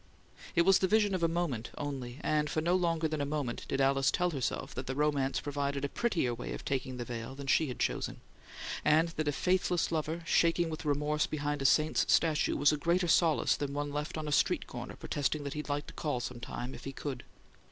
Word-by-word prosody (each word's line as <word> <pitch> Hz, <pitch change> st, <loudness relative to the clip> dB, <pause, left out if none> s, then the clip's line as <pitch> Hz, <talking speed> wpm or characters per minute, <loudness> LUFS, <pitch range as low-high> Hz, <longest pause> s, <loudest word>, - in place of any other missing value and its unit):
It 170 Hz, -, +5 dB
was 195 Hz, +1 st, +5 dB
the 190 Hz, -, +2 dB
vision 210 Hz, 0 st, +3 dB
of 185 Hz, -, -1 dB
a 165 Hz, -, +4 dB
moment 165 Hz, -9 st, -2 dB
only, 135 Hz, -4 st, -4 dB
and 150 Hz, -1 st, +1 dB
for -, -, 0 dB
no 170 Hz, +3 st, +1 dB
longer 165 Hz, -3 st, +1 dB
than 155 Hz, -1 st, -2 dB
a -, -, +1 dB
moment 140 Hz, -4 st, -3 dB
did 135 Hz, -, -1 dB
Alice 135 Hz, 0 st, +3 dB
tell 180 Hz, 0 st, +1 dB
herself 135 Hz, -1 st, -3 dB
that 130 Hz, -, -5 dB
the 135 Hz, -, -2 dB
romance 145 Hz, -2 st, +1 dB
provided 140 Hz, -1 st, -2 dB
a -, -, -3 dB
prettier 170 Hz, -, 0 dB
way 120 Hz, -, -5 dB
of -, -, -7 dB
taking 130 Hz, -1 st, -2 dB
the 120 Hz, -, -4 dB
veil 115 Hz, +2 st, -6 dB
than 140 Hz, 0 st, -7 dB
she 150 Hz, +3 st, +3 dB
had 125 Hz, -, -5 dB
chosen, -, -, -1 dB, 0.6 s
and 160 Hz, +2 st, +4 dB
that 155 Hz, -2 st, -3 dB
a -, -, +3 dB
faithless 180 Hz, +3 st, +1 dB
lover, 160 Hz, +1 st, -2 dB
shaking 170 Hz, 0 st, +3 dB
with 155 Hz, -, -6 dB
remorse 150 Hz, +1 st, +1 dB
behind 145 Hz, -1 st, -2 dB
a -, -, -2 dB
saint's 150 Hz, +4 st, +3 dB
statue, 160 Hz, -2 st, +3 dB
was 145 Hz, +1 st, +5 dB
a 150 Hz, -, 0 dB
greater 175 Hz, +4 st, +1 dB
solace 165 Hz, -2 st, +3 dB
than 140 Hz, -1 st, -4 dB
one 145 Hz, 0 st, -2 dB
left 150 Hz, +2 st, -3 dB
on 155 Hz, -1 st, -4 dB
a -, -, -2 dB
street -, -, +2 dB
corner -, -, -7 dB
protesting 145 Hz, +1 st, -2 dB
that 140 Hz, -, -4 dB
he'd 150 Hz, 0 st, -5 dB
like 145 Hz, 0 st, -1 dB
to -, -, -11 dB
call 145 Hz, -5 st, -2 dB
some 120 Hz, 0 st, -5 dB
time 125 Hz, +2 st, -5 dB
if -, -, -10 dB
he 135 Hz, -, -4 dB
could! 135 Hz, -2 st, -5 dB
150 Hz, 230 wpm, -31 LUFS, 135-165 Hz, 0.6 s, It